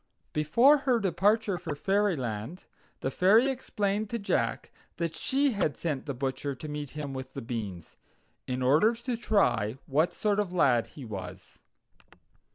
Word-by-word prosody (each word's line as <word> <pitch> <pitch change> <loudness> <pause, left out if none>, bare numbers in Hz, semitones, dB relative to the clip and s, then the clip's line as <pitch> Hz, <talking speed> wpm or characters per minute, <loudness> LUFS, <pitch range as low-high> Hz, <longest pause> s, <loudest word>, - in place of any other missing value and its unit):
Before 235 - +5
her 255 -3 +2
departure 195 +1 +1
for 155 -3 -4
fairyland, 160 - -1 0.4
the 130 - -1
Fairy 220 - +4
explained 210 -5 -2
to 235 - -2
Jack 200 -2 -1 0.3
that 165 -2 -2
she 275 +1 +1
had 195 -9 -1
sent 150 -4 -3
the 140 - -3
butcher 135 +2 -3
to 155 - -8
meet 150 -1 -5
him 145 -2 -4
with 130 0 -7
the - - -3
beans, 105 -8 -6 0.5
in 130 0 -2
order 155 - +4
to 240 +1 -3
try 195 - +1
what 155 +5 +1
sort 210 -1 +1
of 205 -4 -1
lad 125 -10 +3
he 135 - -7
was. 95 -3 -8
160 Hz, 155 wpm, -29 LUFS, 130-210 Hz, 0.5 s, Before